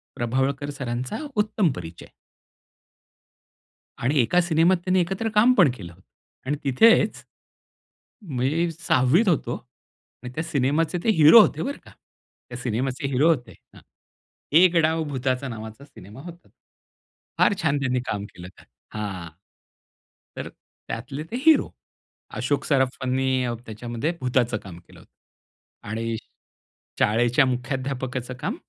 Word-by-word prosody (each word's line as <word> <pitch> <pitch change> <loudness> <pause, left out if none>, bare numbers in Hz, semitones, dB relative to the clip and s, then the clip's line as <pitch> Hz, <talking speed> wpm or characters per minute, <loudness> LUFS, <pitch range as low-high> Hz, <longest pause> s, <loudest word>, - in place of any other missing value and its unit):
प्रभावळकर 135 +4 -1
सरांचा 125 -2 -4 0.2
उत्तम 210 -6 +1
परिचय. 85 -1 -9 1.9
आणि 135 +4 0
एका 150 +10 +3
सिनेमात 170 +2 +3
त्यांनी 185 0 +2
एकत्र 195 +6 -2
काम 230 +4 +6
पण 160 -8 +6
केलं. 85 -6 -10 0.5
आणि 145 +2 0
तिथेच, 180 - +4 1.0
मी 155 +2 -1
6वीत 160 - +2
होतो. 165 - 0 0.7
आणि 125 0 -8
त्या 160 - -3
सिनेमाचे 155 +4 0
ते 225 - +3
हिरो 160 +9 +9
होते, - - +2
बरं 280 +2 -4
का. - - -15 0.6
त्या 120 0 -8
सिनेमाचे 130 +3 -2
हिरो 140 +5 +3
होते. 125 -8 0 0.2
हां. - - -16 0.7
'एक 175 +2 +5
डाव 160 +1 +1
भुताचा' 130 0 -2
नावाचा 110 +3 -8
सिनेमा 110 -4 -14
होता. 175 0 -12 0.9
फार 205 - +4
छान 140 - +1
त्यांनी 130 -2 0
काम 100 -1 -3
केलं. 90 0 -10 0.5
हां. 95 -5 -5 1.1
तर - - -5 0.4
त्यातले 135 +5 -5
ते 240 - -3
हिरो. 320 - +5 0.7
अशोक 145 -2 -1
सराफांनी 130 -1 0 0.2
त्याच्यामध्ये 120 +7 -4
भुताचं 125 -2 +1
काम 90 -4 -11
केलं 85 - -19
होतं - - -22
आणि 115 +1 -3 0.8
शाळेच्या 120 +5 +3
मुख्याध्यापकाचं 130 0 -3
काम 155 - -2
130 Hz, 120 wpm, -24 LUFS, 120-160 Hz, 1.9 s, हिरो